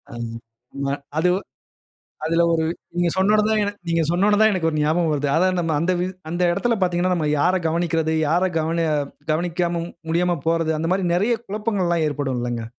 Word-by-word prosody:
ம். 115 -1 -5 0.4
ஆமா. 140 0 -2 0.2
அது 180 +3 +3 1.0
அதில 165 +1 +2
ஒரு 160 -1 +1 0.3
நீங்க 175 -1 +2
சொன்ன 190 +3 +3
உடனே 215 +1 +3 0.3
நீங்க 165 0 +2
சொன்ன 180 +3 +2
உடனே 205 -1 +3
தான் 220 - +6
எனக்கு 175 -4 0
ஒரு 155 - -2
ஞாபகம் 160 +2 +1
வருது. 145 0 0
அதாவது 185 +2 +2
நம்ப 165 -2 0
அந்த 180 +2 +1
வ் 180 - 0 0.2
அந்த 175 - -3
இடத்தில 230 +6 0
பாத்தீங்கன்னா, 180 0 +1
நம்ம 160 -3 -1
யார 180 +5 +3
கவனிக்கிறது 165 -1 0 0.2
யார 175 +4 +2
கவன 165 +1 0 0.4
கவனிக்காம 170 +1 0 0.3
முடியாம 175 0 +1
போறது, 165 -1 +1
அந்த 165 +1 -1
மாரி 190 0 0
நிறைய 210 +7 +2
குழப்பங்கள்லாம் 195 -6 0
ஏற்படும் 140 -3 -2
இல்லைங்க. 120 -1 -3
170 Hz, 175 wpm, -22 LUFS, 160-185 Hz, 1.0 s, தான்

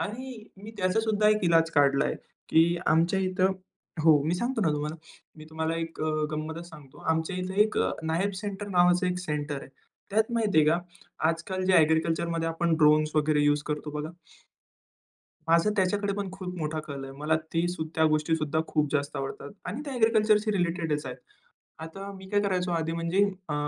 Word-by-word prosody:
आणि 240 +1 -5
मी 205 +3 -10
त्याचा 185 +4 +1
सुद्धा 215 -1 +2
एक 215 -2 +2
इलाज 165 -1 +4
काढला 140 -3 +3
आहे - - -1 0.3
की 170 +2 +4
आमच्या 170 +4 +3
इथं 185 0 +1 0.5
हो 155 -3 +6
मी 165 +3 +1
सांगतो 240 +4 -1
ना 175 - +2
तुम्हाला 150 +2 -3 0.4
मी 155 - -11
तुम्हाला 160 +1 -2
एक 165 0 -5
अ 155 - 0 0.2
गंमतच 160 +3 -5
सांगतो 150 -5 -14
आमच्या 160 +3 -2
इथं 185 +1 -4
एक 215 - -1 0.2
नायब 165 +5 0
सेंटर 205 0 -5
नावाचं 180 -1 +3
एक 180 0 -1
सेंटर 150 -4 -3
आहे. - - -11 0.4
त्यात 220 +3 +1
माहिती 220 -7 +2
आहे 150 - +5
का 170 +2 +3 0.5
आजकाल 185 +3 -2
जे 190 - +3
एग्रीकल्चरमध्ये 165 +1 0
आपण 165 0 0
ड्रोन्स 155 0 +4
वगैरे 150 -1 +3
यूज 145 0 +2
करतो 150 0 -3
बघा. 150 +1 -4 1.4
माझं 170 +5 +4
त्याच्याकडे 200 +1 +1
पण 200 -2 -3
खूप 185 -1 -7
मोठा 155 -1 -2
कल 140 -3 -7
आहे. 135 0 -8
मला 155 +2 +1 0.2
ते 165 +1 +1 0.3
त्या 160 -1 +4
गोष्टी 155 +1 +1
सुद्धा 155 -1 -1
खूप 150 -1 +1
जास्त 145 0 -1
आवडतात 135 +1 -5
आणि 250 +7 -4
त्या 280 - -5
एग्रीकल्चरशी 215 -2 +3
रिलेटेडच 170 -6 -1
आहेत. 125 0 -6 0.6
आता 195 +5 -7
मी 190 0 -11
काय 205 -1 +2
करायचो 185 -3 0
आधी 165 -1 -1
म्हणजे 170 +4 +1 0.3
अ, - - -1
165 Hz, 180 wpm, -27 LUFS, 155-195 Hz, 1.4 s, हो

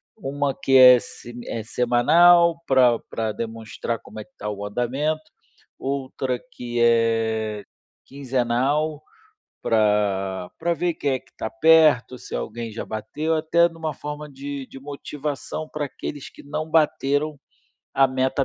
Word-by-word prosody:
uma 140 -7 -2
que 135 0 +3
é 125 -1 +10
sem 120 +1 -11
é 115 - -4
semanal, 165 +9 +4
pra 125 -3 +4
pra 110 -1 -2
demonstrar 115 +1 -5
como 110 - -11
é - - -8
que 135 - -31
tá 105 - -4
o 100 0 -5
andamento, 145 +8 -2 0.5
outra 130 -2 -3
que 120 -1 -4
é 115 -2 +1 0.4
quinzenal, 135 +3 -1 0.6
pra 100 -4 +1
pra 170 +1 0
ver 175 +2 0
quem 140 -3 -1
é 130 - 0
que - - -29
tá 110 - -3
perto, 145 -1 +4
se - - -10
alguém 115 +1 -4
já 115 - -5
bateu, 130 +10 -3
até 170 +2 +3
numa 160 -2 -5
forma 150 +1 -7
de 140 0 -6
de - - -11
motivação 145 +1 -5
pra 150 -1 -3
aqueles 140 +1 -7
que - - -15
não 155 +2 -5
bateram 150 -1 +1 0.6
a 135 0 +5
meta 130 +1 0
135 Hz, 145 wpm, -23 LUFS, 115-150 Hz, 0.6 s, é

